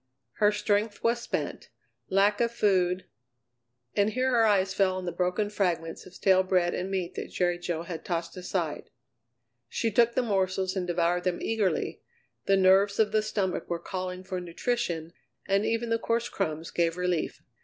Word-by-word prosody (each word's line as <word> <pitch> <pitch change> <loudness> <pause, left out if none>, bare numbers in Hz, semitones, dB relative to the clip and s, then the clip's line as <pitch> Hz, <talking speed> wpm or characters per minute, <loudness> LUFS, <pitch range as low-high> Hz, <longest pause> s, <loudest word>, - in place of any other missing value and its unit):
Her 210 -1 +4
strength 210 0 0
was 235 +1 +2
spent, - - -4 0.4
lack 200 +2 +3
of 235 0 +2
food 185 -5 +2 0.9
And 205 +1 +3
here 255 +3 0
her 230 -2 +4
eyes 195 -2 +2
fell 190 -1 +2
on 185 - -5
the 175 - -2
broken 180 +4 0
fragments 175 -5 -1
of 185 - -15
stale 190 -1 +4
bread 185 -2 +1
and 185 +2 -3
meat 185 -3 -2
that - - -5
Jerry 175 -1 0
Jo 170 -2 -3
had 170 -2 -6
tossed 170 -1 -3
aside. 180 -4 -3 0.8
She 225 - -1
took 235 +2 +3
the 255 - +2
morsels 190 -3 0
and 180 -2 -2
devoured 175 0 +1
them 180 -1 0
eagerly; 220 -4 -1 0.5
the 195 - +5
nerves 195 +2 +5
of 215 -2 +3
the 215 0 +3
stomach 205 -4 -2
were 170 - 0
calling 185 +1 -5
for 185 -1 -4
nutrition, 170 -2 -2 0.3
and 200 +1 +2
even 230 0 -1
the 230 - +2
coarse 230 +1 0
crumbs 160 -4 -3
gave 170 0 +1
relief. 180 -2 -1
190 Hz, 175 wpm, -28 LUFS, 180-210 Hz, 0.9 s, the